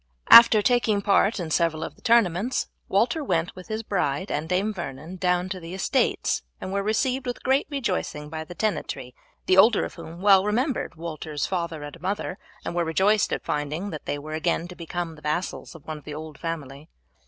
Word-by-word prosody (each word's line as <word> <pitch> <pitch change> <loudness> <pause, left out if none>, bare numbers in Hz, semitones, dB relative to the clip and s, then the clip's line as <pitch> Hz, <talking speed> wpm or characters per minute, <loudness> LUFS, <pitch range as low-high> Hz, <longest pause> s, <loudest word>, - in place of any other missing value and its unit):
After 230 -2 +10
taking 220 -4 +2
part 200 +1 +3
in 165 -3 -4
several 160 -1 +1
of - - -6
the - - -23
tournaments, 230 0 +2 0.2
Walter 240 +10 +2
went 170 -9 -1
with 185 -1 -11
his 220 0 -3
bride 185 -4 -1
and 155 +2 -2
Dame 195 +4 +1
Vernon 160 0 -7
down 180 0 +1
to 185 -1 -4
their 170 +1 -7
estates, 190 - +1 0.2
and 185 - -5
were 200 - +1
received 250 +5 0
with 245 - -4
great 265 +2 +2
rejoicing 185 - -2
by 160 +1 -5
the 175 +2 -11
tenantry, 200 - -3 0.3
the 185 - +3
older 220 +3 +6
of - - -8
whom 165 +2 -10
well 195 -1 +6
remembered 240 - -1
Walter's 155 -3 -4
father 170 -4 -3
and 145 +3 -9
mother, 190 0 -3 0.3
and - - -3
were 175 0 +1
rejoiced 195 +6 +2
at - - -2
finding 155 +5 -2
that 155 - -7
they 145 - -1
were 155 +2 -7
again 165 +2 0
to 180 - -9
become 170 0 -4
the 150 - -15
vassals 155 +3 -3
of 160 - -13
one 155 -1 -5
of - - -20
the 150 - -6
old 155 -1 -8
family. 150 -3 -6
180 Hz, 200 wpm, -25 LUFS, 160-205 Hz, 0.3 s, After